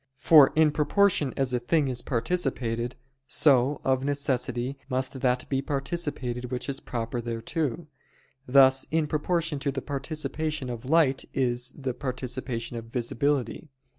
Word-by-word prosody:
For 150 -2 +7
in 155 -1 +5
proportion 150 -1 +2
as 135 -2 +1
a 125 - +1
thing 145 +4 +1
is 125 -2 -1
participated, 120 -3 -1 0.3
so, 135 +1 +3
of 130 0 +1
necessity, 135 -2 -1
must 130 0 -1
that 125 -1 +1
be 135 -1 0
participated 135 -4 -3
which 125 -1 -3
is 140 -1 -2
proper 120 0 -4
thereto; 120 +7 -3 0.6
thus 130 0 +5
in 160 -1 +1
proportion 155 0 -1
to 140 0 -1
the 135 -1 -5
participation 150 0 -3
of 120 0 -7
light 150 -4 +3
is 125 -1 0
the 130 -3 -3
participation 125 -2 -4
of 115 - -6
visibility. 130 +4 -1
135 Hz, 135 wpm, -27 LUFS, 125-150 Hz, 0.6 s, For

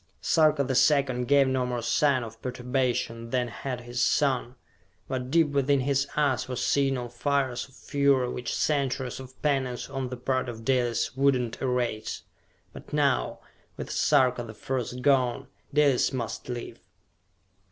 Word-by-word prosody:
Sarka 155 -3 +3
the 130 0 -2
Second 130 -3 +3
gave 140 -1 +5
no 130 -1 +1
more 125 -1 -3
sign 140 0 +2
of 115 0 -10
perturbation 125 -2 -2
than 125 -1 0
had 125 +1 -5
his 120 0 -4
son, 130 -2 +1 0.5
but 130 -1 -3
deep 160 +1 +3
within 140 -1 +2
his 140 +1 +1
eyes 150 -1 +1
were 125 - -3
signal 135 -1 +1
fires 130 +1 -1
of 135 - -21
fury 140 -3 +2
which 125 0 -4
centuries 135 -4 -1
of 130 0 -12
penance 135 -4 -1
on 135 -2 -3
the 125 - -6
part 130 +1 -1
of 115 -1 -8
Dalis 125 -2 +1
would 140 0 +4
not 120 -2 -3
erase. 125 -4 -2 0.5
But - - -12
now, - - +1 0.4
with - - -6
Sarka 125 -2 +3
the 110 -2 -8
First 125 +1 -4
gone, 130 -4 +2 0.3
Dalis 145 -3 +3
must 120 -2 -5
live. 120 -1 -6
130 Hz, 150 wpm, -27 LUFS, 120-140 Hz, 0.5 s, gave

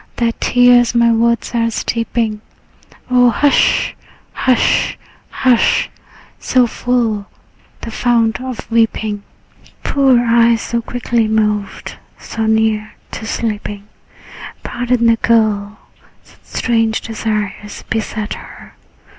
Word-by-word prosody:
Thy 235 -1 +1
tears 245 -1 +4
my 235 0 +4
words 235 +1 +1
are 230 -1 +1
steeping. 230 -1 -2 0.7
O 245 -1 +5
hush, 280 +5 +2 0.4
hush, 255 -2 +1 0.3
hush! 255 -3 +2 0.5
So 255 -1 +2
full, 230 -4 -1 0.5
the 230 - -6
fount 230 -1 +1
of 255 -3 -7
weeping? 220 -2 0 0.6
Poor 270 -3 +3
eyes, 235 -1 +3
so 235 0 -2
quickly 235 -1 -1
moved, 210 -2 -1 0.2
so 225 -1 -4
near 220 -1 0 0.2
to 220 - -6
sleeping? 210 -3 -4 0.8
Pardon 245 -1 -1
the 230 0 +4
girl; 215 -3 +1 0.5
such - - -22
strange 225 -2 0
desires 210 -2 -4
beset 215 -1 -3
her. - - -12
230 Hz, 105 wpm, -16 LUFS, 220-240 Hz, 0.8 s, O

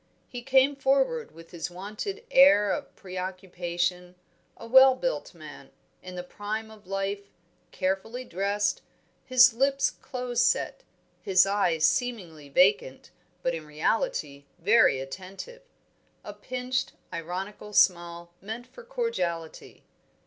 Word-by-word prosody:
He 245 -2 -7
came 270 +2 +3
forward 275 - +1
with 165 0 -15
his 170 0 -5
wonted 210 - -6
air 265 -7 +6
of - - -4
preoccupation; 180 -1 -4 0.4
a - - -10
well 260 +2 +7
built - - -3
man, - - -12 0.3
in 185 0 -9
the 180 - -5
prime 215 +4 -5
of 210 -4 -16
life, 195 +1 -3 0.4
carefully 195 +7 -3
dressed, 200 +1 -1 0.4
his 255 -1 +6
lips 275 +3 +1
close 250 -1 -3
set, - - 0 0.4
his 190 -1 +4
eyes 180 -6 +1
seemingly 180 - -3
vacant, 435 - +2 0.3
but 255 - 0
in 160 -2 -6
reality 150 - -2
very 195 - +4
attentive; 190 - -9 0.6
a - - -8
pinched 255 0 -3 0.2
ironical 185 +5 -6
smile 170 -3 +2
meant 220 +5 -6
for 485 - -14
cordiality. 460 - -4
205 Hz, 120 wpm, -27 LUFS, 180-255 Hz, 0.6 s, well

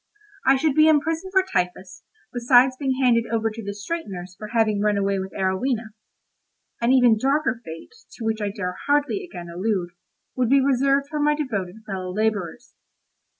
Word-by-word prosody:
I 270 - +7
should 295 +2 +1
be 310 +2 +5
imprisoned 320 +4 +1
for 380 0 +4
typhus, 185 - -3 0.3
besides 245 +1 +4
being 265 -1 -1
handed 230 -2 +3
over 225 -1 0
to 225 +1 -8
the 200 0 -5
straighteners 200 - -6
for 215 - -8
having 215 -2 +1
run 210 -1 +2
away 200 -1 0
with 190 0 -5
Arowhena: 215 +4 -1 0.9
an 235 +2 +3
even 245 -4 +5
darker 270 -1 0
fate, 165 - -10 0.2
to 230 - -7
which 220 -1 -1
I 205 - -1
dare 190 -3 -4
hardly 290 +7 +1
again 175 - -9
allude, 180 0 -2 0.4
would 250 -3 +1
be 275 +1 +5
reserved 275 +1 +2
for 300 0 -4
my 295 0 +3
devoted 220 -8 -4
fellow 185 -3 -5
labourers. 205 -4 -2
225 Hz, 170 wpm, -23 LUFS, 200-275 Hz, 0.9 s, I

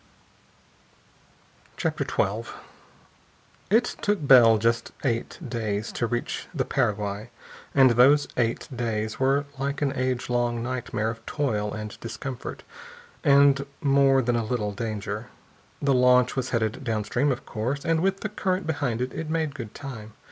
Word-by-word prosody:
CHAPTER - - -1
XII - - -1 1.2
It 225 +3 +5 0.2
took 205 -7 0
Bell 120 -5 +8
just 115 +2 0
eight 120 -4 -1
days 110 -2 -2
to 120 - -1
reach 120 +1 -3
the 130 -4 0
Paraguay, 105 -4 -1 0.5
and 135 -2 +7
those 135 +5 +5
eight 115 -1 0
days 110 -2 -2
were 135 +2 +2
like 140 +1 -2
an 140 -1 +1
age 130 -1 -1
long 120 -1 0
nightmare 120 -3 -2
of 115 -1 -11
toil 105 -8 -1
and 105 0 -6
discomfort 125 +2 -6 0.6
and 140 -2 +5 0.2
more 135 -2 +4
than 120 0 +1
a 115 - +1
little 110 -2 -2
danger. 105 0 -4 0.6
The 140 -1 +3
launch 125 0 +4
was 130 -1 -2
headed 110 +1 -1
downstream, 120 +4 0
of 130 - -4
course, 125 +6 -3
and 165 -1 +2
with 195 +2 0
the 215 - -2
current 190 -3 -1
behind 140 -7 -1
it, 125 - -2
it 160 -1 -5
made 160 -2 -1
good 115 -6 -8
time. 110 -6 -8
125 Hz, 145 wpm, -26 LUFS, 115-140 Hz, 1.2 s, Bell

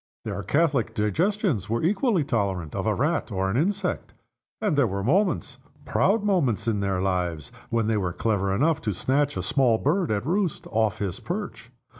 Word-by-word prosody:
Their 100 -2 -3
catholic 135 - +1
digestions 145 - 0
were 115 +1 0
equally 195 - +2
tolerant 100 - -1
of - - -2
a - - +2
rat - - 0
or 95 0 0
an - - -2
insect. 185 +6 -1 0.4
And 210 -7 0
there 140 -4 +3
were 100 0 -3
moments, 145 - +1 0.3
proud 205 +3 +2
moments, 160 - +1
in 110 -3 +1
their 100 -2 0
lives, 90 -5 -1 0.2
when 115 -1 +1
they 110 0 +1
were 95 -3 -1
clever 100 0 0
enough 150 +10 +2
to 105 -4 -2
snatch 140 +7 0
a - - -2
small 135 -6 +3
bird 165 - +1
at 105 +1 -1
roost 180 +1 -1
off 110 -2 +1
his 100 -4 -3
perch. 130 - -5
120 Hz, 180 wpm, -25 LUFS, 100-170 Hz, 0.4 s, there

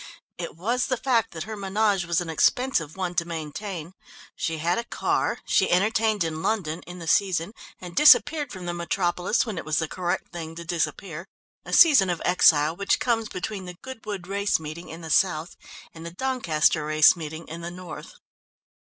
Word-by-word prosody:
It - - -5
was 235 +9 -1
the 255 - 0
fact 230 -3 +1
that 160 -2 -6
her 220 +3 -6
menage 200 -1 0
was 170 -1 +1
an 175 - -5
expensive 165 - +1
one 180 -2 -2
to 175 -1 +1
maintain; 170 +2 -6 0.4
she 165 0 -2
had 170 +6 0
a - - -3
car, - - -1
she - - +2
entertained 215 +2 +2
in 160 -1 -3
London 175 -7 -1
in 175 +1 -8
the 165 -2 -8
season, 185 +2 +1 0.3
and 175 -2 -9
disappeared 300 +2 +5
from 185 -2 -8
the 175 - -3
metropolis 175 +4 0
when 210 -7 -4
it - - -6
was 155 -1 -1
the 160 - 0
correct 175 +2 -3
thing 165 -1 -6
to 170 0 -8
disappear, 170 +1 -3 0.4
a - - -8
season 280 - +6
of 175 -2 -1
exile 160 -3 +4
which 200 +2 +1
comes 225 -3 0
between 190 +1 -5
the 180 -1 -9
Goodwood 215 -8 -7
Race 200 0 0
Meeting 160 +2 -8
in 165 +1 -9
the 160 -1 -6
south 160 -1 +1 0.4
and 160 - -10
the 170 - -6
Doncaster 170 -8 +1
Race 155 +2 +5
Meeting 160 0 -7
in 165 +2 -7
the 170 - -5
north. 180 -1 -9
175 Hz, 190 wpm, -25 LUFS, 165-205 Hz, 0.4 s, season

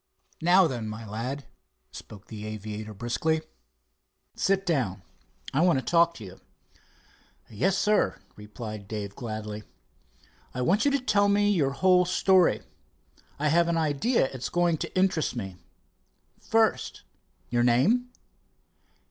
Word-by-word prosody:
"Now 180 +3 +5
then, 120 -8 -3
my 110 +1 -7
lad," 125 +7 -4 0.5
spoke 105 -2 -11
the 105 -2 -9
aviator 110 0 -6
briskly, 120 +9 -1 0.9
"sit 195 0 0
down. 110 - -1 0.5
I 140 - +2
want 175 -5 +4
to 130 - -3
talk 170 0 +3
to 110 - -10
you." 95 0 -12 1.1
"Yes, 180 - +1
sir," 210 +2 +1 0.2
replied 105 -1 -8
Dave 100 -2 -5
gladly. 110 -2 -5 0.9
"I 125 - -2
want 195 - +2
you - - +5
to 280 0 +1
tell 205 -5 +2
me 205 0 +3
your 155 -9 +2
whole 180 +4 +4
story. 185 0 +3 0.7
I 150 +1 +1
have 170 +2 +3
an 170 -1 +1
idea 160 - +1
it - - -6
is - - -3
going 175 -2 +1
to - - -5
interest 185 -7 +1
me. 95 -6 -6 0.8
First, 225 -1 0 0.5
your 120 0 +2
name?" 160 - +3
145 Hz, 135 wpm, -27 LUFS, -, 1.1 s, Now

